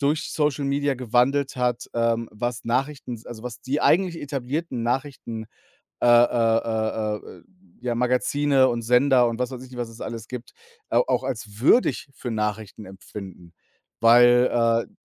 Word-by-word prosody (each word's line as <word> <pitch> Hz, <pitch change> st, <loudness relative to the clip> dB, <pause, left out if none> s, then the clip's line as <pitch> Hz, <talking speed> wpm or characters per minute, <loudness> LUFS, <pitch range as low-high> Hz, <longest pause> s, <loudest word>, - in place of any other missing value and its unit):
durch 145 Hz, +2 st, 0 dB
Social 150 Hz, -2 st, 0 dB
Media 140 Hz, 0 st, 0 dB
gewandelt 130 Hz, +3 st, +1 dB
hat, 125 Hz, -1 st, -1 dB
ähm, 115 Hz, -1 st, 0 dB
was 120 Hz, +3 st, -4 dB
Nachrichten 130 Hz, +1 st, -2 dB
s 110 Hz, -, -12 dB
also, 115 Hz, -1 st, -9 dB
was 125 Hz, 0 st, -7 dB
die 140 Hz, +4 st, -2 dB
eigentlich 175 Hz, -2 st, +2 dB
etablierten 140 Hz, -1 st, -3 dB
Nachrichten, 120 Hz, -3 st, -3 dB, 0.6 s
äh, -, -, +2 dB
äh, 120 Hz, -1 st, +5 dB
äh, 110 Hz, -1 st, -1 dB
äh, -, -, -13 dB
äh, -, -, -22 dB, 0.4 s
ja, 120 Hz, -1 st, -2 dB
Magazine 130 Hz, +3 st, +2 dB
und 115 Hz, -1 st, -2 dB
Sender 125 Hz, +1 st, +4 dB
und 115 Hz, +1 st, -4 dB
was 125 Hz, -, -1 dB
weiß 130 Hz, -1 st, -8 dB
ich 130 Hz, -, -14 dB
nicht, 125 Hz, -, -8 dB
was 120 Hz, -1 st, -3 dB
es 115 Hz, -, -14 dB
alles 115 Hz, -1 st, -6 dB
gibt, 125 Hz, -1 st, -8 dB, 0.4 s
au -, -, +3 dB
auch -, -, +1 dB
als 110 Hz, -5 st, -5 dB
würdig 145 Hz, -, +3 dB
für 125 Hz, -1 st, -6 dB
Nachrichten 105 Hz, -1 st, -3 dB
empfinden. 95 Hz, -2 st, -11 dB, 0.5 s
Weil, 120 Hz, 0 st, +5 dB
äh -, -, -28 dB
120 Hz, 165 wpm, -24 LUFS, 115-135 Hz, 0.6 s, äh